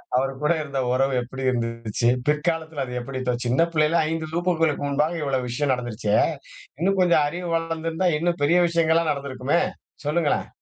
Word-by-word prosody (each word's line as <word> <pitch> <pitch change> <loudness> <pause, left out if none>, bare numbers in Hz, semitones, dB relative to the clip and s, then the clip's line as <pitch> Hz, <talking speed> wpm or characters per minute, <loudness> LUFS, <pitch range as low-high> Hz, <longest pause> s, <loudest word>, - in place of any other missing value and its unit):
அவர் 135 +1 +2
கூட 150 - +2
இருந்த 140 -3 -3
ஒறவு 135 +2 +2
எப்டி 135 +2 -7
இருந்துச்சு? 115 -1 -1 0.2
பிற்காலத்ல 160 -1 0
அது 125 - -8
எப்டி? 130 +2 -5
இப்ப 125 -1 0
சின்ன 125 +6 +2
பிள்ளைல 155 +1 +3
5 160 -1 -3
வகுப்புகளுக்கு 165 -4 +1
முன்பாக 150 +4 0
இவ்ளோ 135 -2 0
விஷயம் 135 +3 0
நடந்துருச்சே. 115 -4 -1 0.6
இன்னும் 195 +3 +1
கொஞ்சம் 170 -4 +4
அறிவு 175 +2 -5
வளர்ந்திருந்தா 165 +1 -1
இன்னும் 170 0 -1
பெரிய 170 +5 +4
விஷயங்கள்லாம் 165 -1 +2
நடந்திருக்குமே 140 +2 -1 0.5
சொல்லுங்களேன். 150 0 +1
150 Hz, 155 wpm, -24 LUFS, 130-165 Hz, 0.6 s, கொஞ்சம்